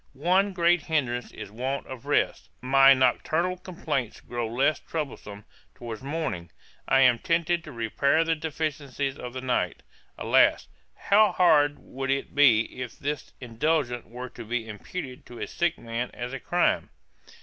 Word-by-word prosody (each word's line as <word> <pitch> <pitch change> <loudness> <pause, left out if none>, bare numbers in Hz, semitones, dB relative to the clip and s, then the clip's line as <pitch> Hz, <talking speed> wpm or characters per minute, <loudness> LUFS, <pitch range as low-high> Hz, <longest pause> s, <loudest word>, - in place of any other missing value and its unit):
'One 180 +8 +2
great 175 -1 +3
hindrance 130 -7 -1
is - - -9
want 130 +5 -3
of 130 -3 -9
rest; - - 0
my 135 +1 +6
nocturnal 160 +8 +1
complaints 150 - -4
grow 120 -1 -4
less 140 +6 +2
troublesome 110 -9 -6 0.3
towards 115 -3 -7
morning; 135 - -3 0.4
and - - +2
I - - +5
am 125 -3 +5
tempted 170 +2 0
to 155 - -10
repair 140 +6 +1
the 165 0 +1
deficiencies 150 -3 -3
of 125 -1 -7
the 130 - -5
night.' 130 -1 -1 0.3
Alas! - - +3 0.3
how 210 +1 +4
hard 145 -5 +4
would 135 0 -6
it 135 0 -1
be 125 -4 +4
if 125 - -6
this 145 0 -4
indulgence 125 +1 -1
were 125 +2 -7
to - - -10
be 115 0 -3
imputed 125 - -7
to 120 - -11
a - - -3
sick 175 -1 -1
man 115 +1 -4
as 125 +2 -5
a 135 - -4
crime. 175 0 +1
135 Hz, 160 wpm, -26 LUFS, 120-160 Hz, 0.4 s, my